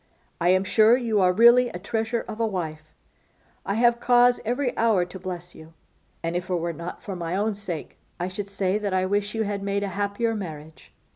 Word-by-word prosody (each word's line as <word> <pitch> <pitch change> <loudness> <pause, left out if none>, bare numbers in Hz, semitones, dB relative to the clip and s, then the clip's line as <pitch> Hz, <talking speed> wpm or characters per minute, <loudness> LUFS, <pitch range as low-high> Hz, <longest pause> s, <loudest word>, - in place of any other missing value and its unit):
I 175 +1 +2
am 185 +1 +4
sure 220 +4 +5
you 225 -5 0
are 180 -1 +5
really 240 +5 +6
a 175 - -6
treasure 225 +4 -2
of 215 - -7
a 225 - +2
wife; 155 -6 -5 0.8
I 200 - 0
have 235 +1 +3
cause 245 0 +4
every 245 +3 -1
hour 220 -6 +2
to 185 +2 -10
bless 180 -1 -6
you; 160 +1 -14 0.5
and, 165 +1 -2
if 180 +1 -3
it 180 - +1
were 170 0 -2
not 170 +3 -8
for 195 - -5
my 170 0 -3
own 210 +2 0
sake, 195 -6 -6 0.2
I 175 - -1
should 195 +2 -6
say 200 0 0
that 200 -3 -2
I 185 0 +2
wish 205 +2 -1
you 225 - +1
had 200 -1 -3
made 200 0 -1
a 200 - -2
happier 205 +4 -1
marriage. 160 -6 -8
200 Hz, 215 wpm, -25 LUFS, 180-225 Hz, 0.8 s, really